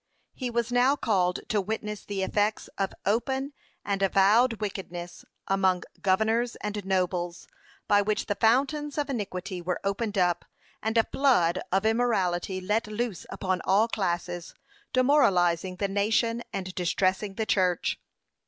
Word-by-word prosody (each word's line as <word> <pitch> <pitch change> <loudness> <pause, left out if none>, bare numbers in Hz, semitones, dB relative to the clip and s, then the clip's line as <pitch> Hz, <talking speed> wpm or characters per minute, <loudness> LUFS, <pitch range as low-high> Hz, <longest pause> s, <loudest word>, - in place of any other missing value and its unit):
He 255 -2 -4
was 235 0 -1
now 250 +3 +4
called 185 -9 +1
to 210 -2 +2
witness 210 +1 -4
the 195 -2 -3
effects 210 +2 0
of 195 -1 -2
open 265 +6 0 0.3
and 200 -1 -1
avowed 205 +6 +4
wickedness 185 -5 -6 0.2
among 190 -2 +2 0.2
governors 220 +5 +2
and 210 0 -4
nobles, 180 -2 -1 0.4
by 205 0 +5
which 210 +1 -1
the 205 - 0
fountains 275 +7 +1
of 290 -1 -1
iniquity 185 -6 -4
were 180 +1 -2
opened 200 +1 -2
up, 180 -2 +2 0.4
and 220 +1 -1
a 225 - +5
flood 185 -11 +3
of 195 +3 +1
immorality 195 -6 +1
let 210 +4 0
loose 215 -3 -3
upon 185 -2 -2
all 205 +4 +3
classes; 175 -5 -3 0.4
demoralizing 190 - +3
the 200 +2 -1
nation, 220 +4 +1
and 185 -1 -4
distressing 190 +3 0
the 220 - -1
church. 185 -4 +1
200 Hz, 140 wpm, -27 LUFS, 185-230 Hz, 0.4 s, by